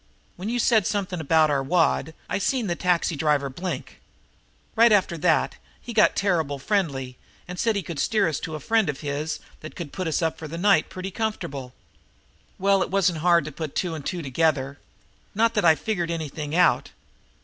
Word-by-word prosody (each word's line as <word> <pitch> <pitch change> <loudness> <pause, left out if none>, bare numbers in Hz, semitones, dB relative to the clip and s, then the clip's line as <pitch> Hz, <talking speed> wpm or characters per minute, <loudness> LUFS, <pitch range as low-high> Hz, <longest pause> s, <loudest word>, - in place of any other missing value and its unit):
When 190 +4 -5
you 240 - -1
said 225 -5 +3
something 190 -4 -2
about 160 0 +3
our 140 -1 +1
wad 160 +1 +1
I - - -1
seen 245 +4 0
the 175 -3 -1
taxi 175 -2 +1
driver 145 -2 +1
blink. 180 +7 -6 0.7
Right 230 0 +6
after 195 -4 +3
that 160 -1 +2 0.2
he 240 - -8
got 215 - +4
terrible 165 -8 0
friendly 135 -7 -1 0.3
and 180 0 -7
said 225 -2 +1
he 200 - -1
could 165 -2 -6
steer 215 -6 +2
us 155 -4 -2
to 160 - -5
a - - -5
friend 220 +4 +1
of 140 - -4
his 150 +1 -3 0.2
that 155 - -10
could 165 -5 -7
put 185 -3 -3
us 160 +1 0
up 160 0 -1
for 160 - -6
the 165 +3 -6
night 200 +3 +3
pretty 185 +1 -6
comfortable. 140 - -4 0.8
Well, 195 0 +3
it - - -1
wasn't 180 -3 +1
hard 170 -2 +3
to 155 - -6
put 155 0 -6
two 180 -3 -1
and 155 -3 -6
two 175 0 -3
together. 140 -1 0 0.6
Not 230 +2 +3
that 210 -5 +1
I 160 -1 +7
figured 175 -3 -2
anything 155 -2 -4
out. 180 -1 +3
170 Hz, 195 wpm, -24 LUFS, 150-195 Hz, 0.8 s, I